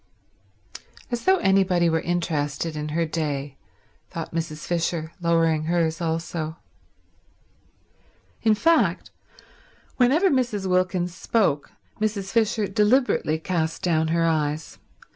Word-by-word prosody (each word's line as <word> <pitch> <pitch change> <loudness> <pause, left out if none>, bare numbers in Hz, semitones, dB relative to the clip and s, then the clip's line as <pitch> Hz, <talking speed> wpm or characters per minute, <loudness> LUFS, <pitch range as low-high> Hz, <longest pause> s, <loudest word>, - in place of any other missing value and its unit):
"As 240 -1 -3
though 380 +1 +5
anybody 190 - +3
were 160 0 +2
interested 165 -2 -2
in 150 0 -4
her 165 +2 0
day," 145 -4 -3 0.5
thought 165 -1 -6
Mrs. 160 -2 -4
Fisher, 170 -2 -1
lowering 165 -2 +2
hers 165 0 0
also. 165 -1 -3 1.8
In 220 -2 +4
fact, 330 +9 +2 0.9
whenever 295 +10 +4
Mrs. 240 -7 0
Wilkins 185 -1 0
spoke 190 -8 0 0.3
Mrs. 210 -2 -2
Fisher 225 -1 +1
deliberately 210 - +2
cast 160 -1 -2
down 160 -3 +2
her 165 +1 +1
eyes. 155 -1 -1
170 Hz, 105 wpm, -24 LUFS, 160-200 Hz, 1.8 s, though